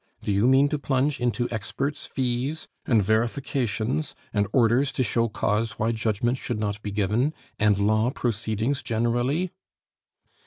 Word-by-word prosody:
Do -, -, -1 dB
you 100 Hz, +4 st, +3 dB
mean 135 Hz, +2 st, +5 dB
to 150 Hz, -1 st, -1 dB
plunge 135 Hz, +1 st, 0 dB
into 120 Hz, 0 st, 0 dB
experts' 135 Hz, +7 st, -3 dB
fees 130 Hz, +4 st, -2 dB, 0.2 s
and 110 Hz, -5 st, +4 dB
verifications, 120 Hz, +4 st, 0 dB, 0.2 s
and 105 Hz, -1 st, +1 dB
orders 125 Hz, +3 st, +3 dB
to 130 Hz, -, +1 dB
show 115 Hz, -1 st, +1 dB
cause 110 Hz, +1 st, 0 dB
why 110 Hz, +2 st, +1 dB
judgment 115 Hz, +2 st, 0 dB
should 120 Hz, -4 st, -3 dB
not 105 Hz, -1 st, -2 dB
be 105 Hz, -, -4 dB
given, 105 Hz, +9 st, 0 dB, 0.2 s
and 105 Hz, -2 st, +4 dB
law 110 Hz, +3 st, +2 dB
proceedings 115 Hz, 0 st, -1 dB
generally?" 120 Hz, +9 st, 0 dB
120 Hz, 145 wpm, -25 LUFS, 110-135 Hz, 0.2 s, mean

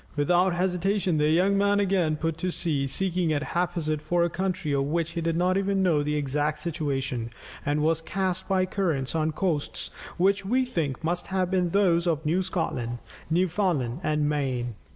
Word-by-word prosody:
Without 175 Hz, +5 st, +2 dB
hesitation, 180 Hz, -1 st, +1 dB
the 150 Hz, 0 st, +3 dB
young 185 Hz, +5 st, +3 dB
man 200 Hz, 0 st, +3 dB
again 185 Hz, -6 st, +2 dB
put 165 Hz, +1 st, -2 dB
to 185 Hz, -, -1 dB
sea, 150 Hz, -6 st, -1 dB
seeking 180 Hz, +2 st, 0 dB
at 145 Hz, -1 st, 0 dB
haphazard 170 Hz, -4 st, -1 dB
for 170 Hz, +3 st, +1 dB
a 170 Hz, -, 0 dB
country 185 Hz, -4 st, -2 dB
of 140 Hz, -1 st, +1 dB
which 165 Hz, +3 st, -1 dB
he 170 Hz, -, -3 dB
did 165 Hz, 0 st, 0 dB
not 180 Hz, +2 st, +2 dB
even 195 Hz, 0 st, +1 dB
know 165 Hz, -5 st, +3 dB
the 150 Hz, +1 st, -1 dB
exact 150 Hz, +1 st, 0 dB
situation, 140 Hz, -7 st, -2 dB, 0.3 s
and 150 Hz, +1 st, 0 dB
was 160 Hz, +1 st, +2 dB
cast 185 Hz, +2 st, -2 dB
by 190 Hz, -1 st, +3 dB
currents 165 Hz, -9 st, -1 dB
on 160 Hz, -1 st, +1 dB
coasts 155 Hz, -2 st, -1 dB, 0.3 s
which 195 Hz, +2 st, +2 dB
we 255 Hz, +6 st, +1 dB
think 160 Hz, -, -3 dB
must 175 Hz, +2 st, -1 dB
have 185 Hz, -1 st, -1 dB
been 180 Hz, -2 st, +2 dB
those 175 Hz, -2 st, +2 dB
of 160 Hz, -2 st, 0 dB
New 170 Hz, +5 st, +2 dB
Scotland, 130 Hz, -10 st, -2 dB, 0.3 s
Newfoundland, 165 Hz, -, 0 dB
and 150 Hz, -3 st, +1 dB
Maine. 130 Hz, -5 st, -1 dB
170 Hz, 180 wpm, -26 LUFS, 150-185 Hz, 0.3 s, the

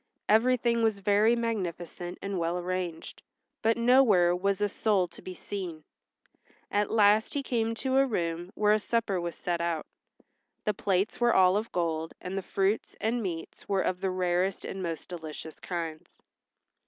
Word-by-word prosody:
Everything 235 Hz, +1 st, +3 dB
was 220 Hz, -2 st, +2 dB
very 205 Hz, +4 st, +3 dB
magnificent 180 Hz, -6 st, -3 dB
and 195 Hz, -2 st, -2 dB
well 170 Hz, +1 st, 0 dB
arranged, 180 Hz, -2 st, -4 dB, 0.4 s
but 225 Hz, +1 st, +2 dB
nowhere 235 Hz, -8 st, +5 dB
was 195 Hz, +2 st, 0 dB
a 205 Hz, -, +2 dB
soul 200 Hz, -2 st, +1 dB
to -, -, -14 dB
be 185 Hz, -, -8 dB
seen. 175 Hz, -5 st, -6 dB, 0.9 s
At 205 Hz, 0 st, +1 dB
last 215 Hz, +2 st, +4 dB
he 280 Hz, -, -1 dB
came 230 Hz, -3 st, 0 dB
to 260 Hz, +3 st, 0 dB
a 270 Hz, 0 st, +5 dB
room 175 Hz, -5 st, -2 dB
where 210 Hz, 0 st, +4 dB
a 215 Hz, -, +3 dB
supper 210 Hz, -4 st, 0 dB
was 170 Hz, -1 st, -4 dB
set 175 Hz, -1 st, -2 dB
out. 170 Hz, -2 st, -1 dB, 0.8 s
The 210 Hz, -, +2 dB
plates 195 Hz, +3 st, 0 dB
were 240 Hz, 0 st, +4 dB
all 185 Hz, 0 st, +6 dB
of 215 Hz, +2 st, -2 dB
gold, 165 Hz, -2 st, -2 dB
and 185 Hz, +1 st, -5 dB
the 195 Hz, -, -1 dB
fruits 195 Hz, +3 st, -1 dB
and 230 Hz, +2 st, 0 dB
meats 170 Hz, -5 st, -6 dB
were 195 Hz, -1 st, +2 dB
of 180 Hz, 0 st, -1 dB
the 190 Hz, -, 0 dB
rarest 185 Hz, +1 st, 0 dB
and 190 Hz, -, -5 dB
most 165 Hz, -3 st, -4 dB
delicious 160 Hz, -2 st, -8 dB
kinds. 165 Hz, -3 st, -6 dB
195 Hz, 165 wpm, -29 LUFS, 175-220 Hz, 0.9 s, all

